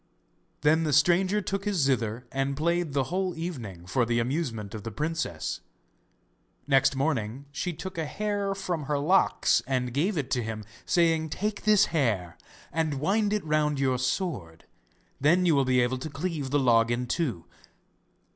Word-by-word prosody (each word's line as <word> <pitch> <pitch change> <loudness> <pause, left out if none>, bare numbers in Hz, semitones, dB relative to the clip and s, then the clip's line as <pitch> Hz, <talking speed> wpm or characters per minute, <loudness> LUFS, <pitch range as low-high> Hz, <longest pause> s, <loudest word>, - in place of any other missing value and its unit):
Then 155 +2 +4
the 150 -2 0
stranger 185 +7 +3
took 195 0 -3
his 205 -2 0
zither 125 -5 0
and 135 +1 -1
played 170 -1 0
the 135 +3 -1
whole 185 -2 -1
evening 120 - -6
for 95 +7 +1
the 120 0 0
amusement 115 - -2
of 110 - -6
the 115 - -5
princess. 150 - -3 1.1
Next 135 -1 +3
morning 135 -3 -1
she 175 +5 -3
took 180 +1 -7
a 160 - -2
hair 205 +1 -2
from 175 -6 -3
her 145 +1 0
locks 175 +7 +3
and 125 -2 -1
gave 170 +8 0
it 135 -3 -3
to 125 - +1
him, 110 -1 -5 0.2
saying: 165 -2 +2
'Take 210 +7 -3
this 210 -2 +6
hair, 105 - 0 0.4
and 155 -3 -1
wind 205 +7 +1
it 210 -5 -1
round 150 -2 +1
your 130 -2 +1
sword, 125 - -3 0.5
then 170 +6 +4
you 170 - +4
will 140 -2 +3
be 130 -1 +3
able 125 +1 0
to 155 - -5
cleave 150 -1 -3
the 145 - +2
log 115 -4 +4
in 120 +1 -1
two. 120 - -2
145 Hz, 170 wpm, -27 LUFS, 125-170 Hz, 1.1 s, this